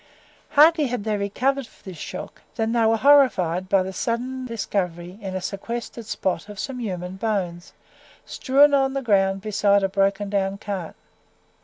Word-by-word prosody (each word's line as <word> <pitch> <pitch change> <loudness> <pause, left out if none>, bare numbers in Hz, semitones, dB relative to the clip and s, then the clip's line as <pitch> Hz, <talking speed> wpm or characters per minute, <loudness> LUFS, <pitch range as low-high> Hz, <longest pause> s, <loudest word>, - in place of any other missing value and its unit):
Hardly 310 0 +6
had 245 -4 -3
they 215 0 -1
recovered 250 +6 -1
this 185 -5 -9
shock, - - -7
than 225 -1 -1
they 235 -1 +2
were 225 0 +3
horrified 205 - +4
by 195 -2 +3
the 190 +1 -6
sudden 250 +5 -3
discovery 185 -5 -3
in 190 -2 -5
a 185 - -2
sequestered 230 +3 -5
spot 190 -2 -2
of 205 - -9
some 255 +4 -4
human 185 -4 -5
bones, 190 -5 -3 0.5
strewn 285 +2 +3
upon 270 -1 +2
the 275 - -2
ground 195 -3 +2
beside 205 -1 +2
a 195 - +1
broken 195 +1 +1
down 195 -1 -1
cart. 195 -5 -5
205 Hz, 160 wpm, -23 LUFS, 190-240 Hz, 0.5 s, Hardly